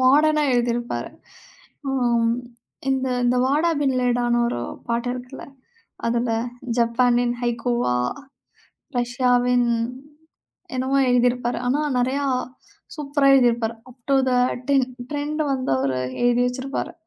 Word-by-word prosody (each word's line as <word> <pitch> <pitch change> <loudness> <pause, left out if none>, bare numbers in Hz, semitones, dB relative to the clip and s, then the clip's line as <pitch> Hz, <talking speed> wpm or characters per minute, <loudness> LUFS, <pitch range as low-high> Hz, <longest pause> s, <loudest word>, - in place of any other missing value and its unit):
மாடர்னா 300 +4 +4
எழுதியிருப்பார். 240 0 -1 0.8
அம் 240 -3 +2 0.6
இந்த 265 0 0 0.2
இந்த 245 +1 +2
வாடா 300 +5 +2
பின்லேடான்னு 245 -3 +1
ஒரு 120 - -3 0.3
பாட்டு 235 +1 -1
இருக்குல்ல. 250 +1 -8 0.6
அதுல 235 +1 0 0.5
'ஜப்பானின் 240 +1 +2
ஹைக்கூவா, 240 - 0 1.0
ரஷ்யாவின்' 245 0 +2 1.1
என்னவோ 260 +2 0
எழுதியிருப்பார். 245 0 +2
ஆனா 265 +4 +1 0.2
நெறையா 260 +3 0 0.7
சூப்பரா 285 -1 0
எழுதியிருப்பார். 235 -3 +2 0.2
"App 250 0 -19
to - - +5
the - - +1 0.4
tin 270 -2 +3 0.2
trend" 295 +1 -2
வந்து 260 -1 -2
அவரு 130 -1 0 0.2
எழுதி 245 0 +3
வச்சிருப்பாரு. 260 +2 -3
245 Hz, 100 wpm, -23 LUFS, 240-270 Hz, 1.1 s, to